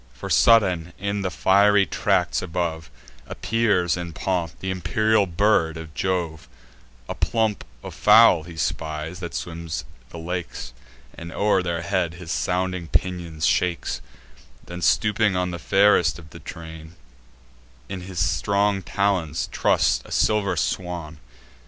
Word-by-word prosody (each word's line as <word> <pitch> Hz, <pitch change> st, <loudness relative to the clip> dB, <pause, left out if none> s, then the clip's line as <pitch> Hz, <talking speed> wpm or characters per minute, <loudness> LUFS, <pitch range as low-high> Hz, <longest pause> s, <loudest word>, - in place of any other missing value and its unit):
For, -, -, -7 dB
sudden, 90 Hz, -7 st, +4 dB
in 100 Hz, +1 st, -2 dB
the 95 Hz, -, -1 dB
fiery 100 Hz, +2 st, +4 dB
tracts -, -, 0 dB
above, 85 Hz, -2 st, -3 dB, 0.4 s
Appears 100 Hz, -5 st, +1 dB
in 85 Hz, -2 st, -6 dB
pomp 85 Hz, -1 st, -2 dB
th' -, -, -24 dB
imperial 100 Hz, +3 st, +1 dB
bird 85 Hz, -3 st, +2 dB
of 80 Hz, -1 st, -9 dB
Jove: 85 Hz, -4 st, -2 dB, 0.6 s
A -, -, -3 dB
plump 110 Hz, -3 st, 0 dB, 0.2 s
of -, -, -7 dB
fowl 105 Hz, -5 st, +6 dB
he 85 Hz, 0 st, -11 dB
spies, 80 Hz, +2 st, -3 dB
that 85 Hz, -2 st, -6 dB
swim 85 Hz, -1 st, -6 dB, 0.4 s
the -, -, -10 dB
lakes, 85 Hz, -7 st, -5 dB, 0.4 s
And 85 Hz, 0 st, -9 dB
o'er 100 Hz, 0 st, +2 dB
their 85 Hz, -2 st, -3 dB
heads 85 Hz, -2 st, -1 dB
his 85 Hz, -2 st, -8 dB
sounding 90 Hz, +1 st, -1 dB
pinions 85 Hz, -3 st, -1 dB
shakes; 85 Hz, -9 st, 0 dB, 0.6 s
Then, 90 Hz, 0 st, -8 dB
stooping 105 Hz, +1 st, +2 dB
on 90 Hz, 0 st, -1 dB
the 85 Hz, -, -5 dB
fairest 95 Hz, -3 st, +3 dB
of 80 Hz, -3 st, -14 dB
the -, -, -11 dB
train, 80 Hz, 0 st, -10 dB, 0.9 s
In 95 Hz, +5 st, -6 dB
his 90 Hz, 0 st, -9 dB
strong 100 Hz, +5 st, +1 dB
talons 90 Hz, -6 st, -1 dB
truss'd -, -, +2 dB
a -, -, -15 dB
silver 105 Hz, -2 st, +1 dB
swan. 85 Hz, -5 st, -3 dB
90 Hz, 135 wpm, -23 LUFS, 80-100 Hz, 0.9 s, fowl